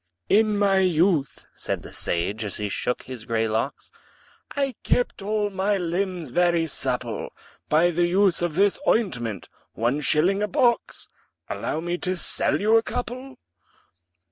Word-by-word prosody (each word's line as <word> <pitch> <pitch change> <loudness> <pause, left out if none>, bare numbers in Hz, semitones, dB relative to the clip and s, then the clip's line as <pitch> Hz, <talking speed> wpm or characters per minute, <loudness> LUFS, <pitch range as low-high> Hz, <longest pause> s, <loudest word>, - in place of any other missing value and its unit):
"In 215 0 +4
my 200 -1 +3
youth," 175 -4 +1
said - - -4
the - - -11
sage, 100 +6 -1
as 105 - -4
he 105 -1 -3
shook 125 +5 -2
his 125 -3 -8
grey 115 0 0
locks, 110 +5 -3 0.6
"I 275 -2 0
kept 245 -4 0
all 210 0 -1
my 195 +1 0
limbs 180 -2 -2
very 175 +1 +2
supple 125 -6 -2 0.4
By 165 +3 +4
the 175 +1 +1
use 185 0 +3
of 175 -3 -1
this 200 +2 +3
ointment 125 - 0 0.3
one 120 +6 0
shilling 175 +8 +2
a 210 - +1
box 235 +4 +1 0.4
Allow 155 - -3
me 175 +1 -3
to 185 0 -1
sell - - +2
you 220 +2 +4
a - - +4
couple?" 250 +3 -5
175 Hz, 150 wpm, -24 LUFS, 135-205 Hz, 0.6 s, In